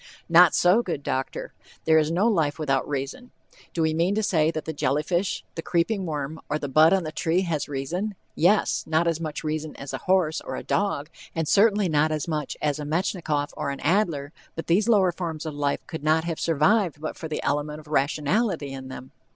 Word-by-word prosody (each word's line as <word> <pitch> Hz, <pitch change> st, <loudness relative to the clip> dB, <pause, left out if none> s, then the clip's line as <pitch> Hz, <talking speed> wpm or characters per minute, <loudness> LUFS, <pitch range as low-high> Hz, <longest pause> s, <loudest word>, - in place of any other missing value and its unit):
Not 170 Hz, 0 st, +6 dB
so, 180 Hz, +6 st, +4 dB
good 165 Hz, -10 st, -4 dB
doctor! 130 Hz, 0 st, -3 dB, 0.3 s
There 160 Hz, 0 st, +5 dB
is 155 Hz, 0 st, +1 dB
no 180 Hz, +7 st, +2 dB
life 160 Hz, -10 st, +1 dB
without 135 Hz, -4 st, 0 dB
reason. 145 Hz, -, -4 dB, 0.4 s
Do 165 Hz, -, -1 dB
we 160 Hz, 0 st, +1 dB
mean 170 Hz, +5 st, +1 dB
to 220 Hz, -, 0 dB
say 160 Hz, -7 st, +2 dB
that 155 Hz, -1 st, -4 dB
the 160 Hz, -, -4 dB
jelly 145 Hz, +1 st, 0 dB
fish, 175 Hz, +1 st, -1 dB
the 165 Hz, -, -5 dB
creeping 180 Hz, +3 st, 0 dB
worm, 150 Hz, 0 st, -4 dB
or 150 Hz, -, 0 dB
the 145 Hz, -, -4 dB
bud 155 Hz, +4 st, +5 dB
on 195 Hz, -2 st, +3 dB
the 155 Hz, -, -4 dB
tree 170 Hz, +3 st, +1 dB
has 165 Hz, -6 st, -2 dB
reason? 175 Hz, +10 st, -3 dB, 0.2 s
Yes; 195 Hz, +6 st, +2 dB
not 160 Hz, +1 st, +2 dB
as 165 Hz, -1 st, 0 dB
much 155 Hz, -1 st, -4 dB
reason 155 Hz, 0 st, -3 dB
as 140 Hz, -, -8 dB
a -, -, -3 dB
horse 180 Hz, -4 st, +1 dB
or -, -, -6 dB
a -, -, -5 dB
dog, 170 Hz, -7 st, -1 dB, 0.2 s
and 165 Hz, -2 st, -1 dB
certainly 205 Hz, 0 st, +4 dB
not 155 Hz, -1 st, +2 dB
as 155 Hz, 0 st, -2 dB
much 150 Hz, -4 st, -3 dB
as 150 Hz, -1 st, 0 dB
a -, -, -4 dB
Metchnikoff 155 Hz, -2 st, -1 dB
or -, -, -3 dB
an 140 Hz, -, -4 dB
Adler, 160 Hz, -5 st, 0 dB, 0.2 s
but 165 Hz, -, -5 dB
these 200 Hz, +7 st, +2 dB
lower 195 Hz, -5 st, +4 dB
forms 165 Hz, -3 st, -5 dB
of 155 Hz, -, -4 dB
life 145 Hz, -1 st, -1 dB
could 160 Hz, -3 st, -7 dB
not 155 Hz, +1 st, +3 dB
have 165 Hz, -1 st, -3 dB
survived 165 Hz, +1 st, +2 dB
but 155 Hz, -, -5 dB
for 160 Hz, -, -6 dB
the 155 Hz, -, -4 dB
element 150 Hz, +1 st, -1 dB
of 155 Hz, -, -14 dB
rationality 150 Hz, -, 0 dB
in 130 Hz, -1 st, -7 dB
them. 130 Hz, 0 st, -9 dB
160 Hz, 215 wpm, -25 LUFS, 150-180 Hz, 0.4 s, Not